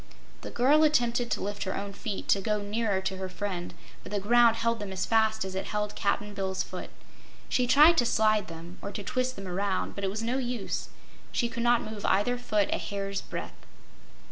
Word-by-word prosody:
The - - -6
girl 285 +6 +4
attempted 245 -5 +2
to - - -1
lift 205 0 -4
her 190 - -2
own 200 0 -5
feet, 205 -1 -5
to 195 - +4
go 210 +1 0
nearer 205 -2 0
to 190 0 -3
her 190 0 -4
friend, 185 -2 -4 0.3
but - - -11
the 205 - 0
ground 235 +3 +5
held 230 0 0
them 205 -2 -5
as 185 -1 -2
fast 220 -2 +2
as 190 - -5
it 190 - -3
held 210 -1 -2
Cap'n 205 +1 -1
Bill's 190 -2 -2
foot. - - -7 0.6
She 250 -1 +2
tried 300 +6 +7
to 240 - +3
slide 215 -3 +2
them, 165 +2 -10
or 200 - -5
to 205 - -5
twist 255 +5 -1
them 195 -1 -7
around, 190 +1 -1
but 200 - -6
it 195 - +1
was 215 +3 -3
no 245 +4 0
use; 245 -5 -3 0.4
she 235 - 0
could 235 0 -4
not 240 0 +3
move 215 -1 -7
either 245 +5 +2
foot 210 -4 +1
a - - -1
hair's 195 -1 -3
breadth. - - -7
210 Hz, 215 wpm, -28 LUFS, 195-235 Hz, 0.6 s, tried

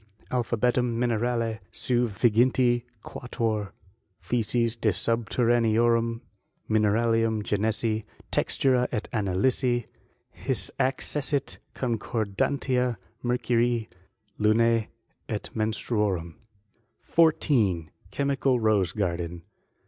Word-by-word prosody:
Alphabetum 120 0 +1
Minerale 115 -1 0
sen 120 -1 0
viginti 120 +3 +3 0.2
quatuor 110 -4 -3 0.5
theses 115 0 0
de 115 -1 +1
subterraneorum 115 +2 +2 0.5
mineralinm 110 +1 +2
genesi, 110 +1 0 0.3
textura 125 -2 +2
et 110 -3 -2
analvsi; 120 +4 +1 0.5
his - - -3
accessit 140 +2 -1 0.2
concordantia 120 +2 -1 0.3
mercurii 120 -1 +1 0.5
lunse 115 +1 +3 0.4
et - - -3
menstruorum. 105 -5 -1 0.7
14. 115 - +2 0.2
Chemical 135 +1 +1
Rose 105 -5 +2
garden. 85 -4 -2
115 Hz, 70 wpm, -27 LUFS, 110-125 Hz, 0.7 s, viginti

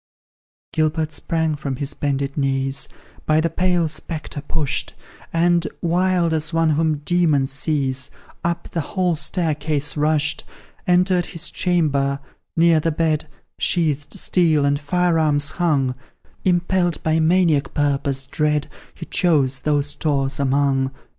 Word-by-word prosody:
Gilbert 155 0 0
sprang 160 +1 -1
from 140 -2 -4
his 140 +2 -3
bended 140 -1 -2
knees, 135 -1 0 0.4
By 155 0 +4
the 165 0 0
pale 180 -1 +1
spectre 155 -1 -5
pushed, 150 -1 -2 0.4
And, 170 0 +2
wild 175 0 +1
as 160 0 -1
one 165 -1 +2
whom 155 -1 0
demons 155 -7 +2
seize, 135 -3 0 0.3
Up 170 0 -2
the 165 - -1
hall 180 +3 0
staircase 150 -3 -2
rushed; 150 0 +1 0.4
Entered 180 0 +3
his 170 0 -2
chamber 140 -6 +1 0.4
near 165 -1 +5
the 165 - 0
bed 155 -1 0 0.3
Sheathed 155 -4 0
steel 160 -5 +2
and 140 0 +1
fire 175 +2 +1
arms 145 -2 +2
hung 140 -7 +2 0.5
Impelled 175 -2 +1
by 160 0 +2
maniac 160 -3 +2
purpose 140 -2 0
dread 150 +1 0 0.3
He 165 - -8
chose 140 -8 +2
those 145 0 +1
stores 145 -2 -1
among. 135 -1 +2
155 Hz, 125 wpm, -21 LUFS, 140-170 Hz, 0.5 s, near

